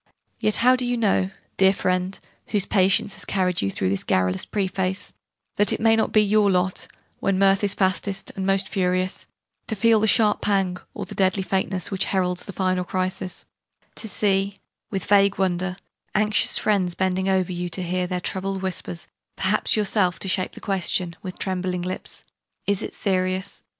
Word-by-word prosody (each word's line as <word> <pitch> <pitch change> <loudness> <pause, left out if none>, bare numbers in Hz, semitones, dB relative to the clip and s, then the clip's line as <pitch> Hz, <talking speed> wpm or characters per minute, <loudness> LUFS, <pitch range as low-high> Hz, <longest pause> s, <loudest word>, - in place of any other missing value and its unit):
Yet 215 - +1
how 255 +1 +7
do 255 - 0
you 245 0 0
know 195 -4 +2 0.3
dear 190 0 +5
friend, 185 0 -1 0.3
whose 205 -3 +2
patience 195 0 +2
has - - -2
carried 180 -3 0
you 100 - 0
through 95 -1 -1
this 100 0 0
garrulous 95 0 0
preface 190 -1 -2 0.4
that 205 -1 +4
it - - 0
may 225 0 +4
not 220 - +1
be 215 - +5
your 210 0 +3
lot, 180 0 0 0.3
when 195 -1 +1
mirth 195 +1 +3
is 200 - +1
fastest 190 +1 0
and 190 - -3
most 195 0 +2
furious, 185 -2 -1 0.4
to 220 - -1
feel 225 +2 +4
the 220 - +2
sharp 215 -1 +3
pang, 195 -3 +1 0.2
or - - -4
the - - -9
deadly 190 0 +1
faintness, 190 -1 -1
which 195 -1 +1
heralds 180 -2 -1
the - - -7
final 185 -1 0
crisis 185 0 -3 0.5
to 220 - -3
see, 195 -1 +1 0.3
with 195 -3 -3
vague 200 -1 +4
wonder, 185 -1 -1 0.4
anxious 210 +1 +3
friends 185 -5 +1
bending 190 0 0
over 185 -1 +1
you 175 0 -3
to 185 +2 0
hear 180 +1 -1
their 180 0 -2
troubled 190 +1 -3
whispers 180 -2 -3 0.3
perhaps 190 +3 +2
yourself 200 -3 +2
to - - -4
shape 185 0 0
the - - -10
question, 185 -3 -1
with 185 -2 -7
trembling 185 -1 -2
lips, 185 +1 -5 0.4
"Is 200 -1 +1
it - - -6
serious?" 185 0 -1
190 Hz, 180 wpm, -23 LUFS, 185-200 Hz, 0.5 s, how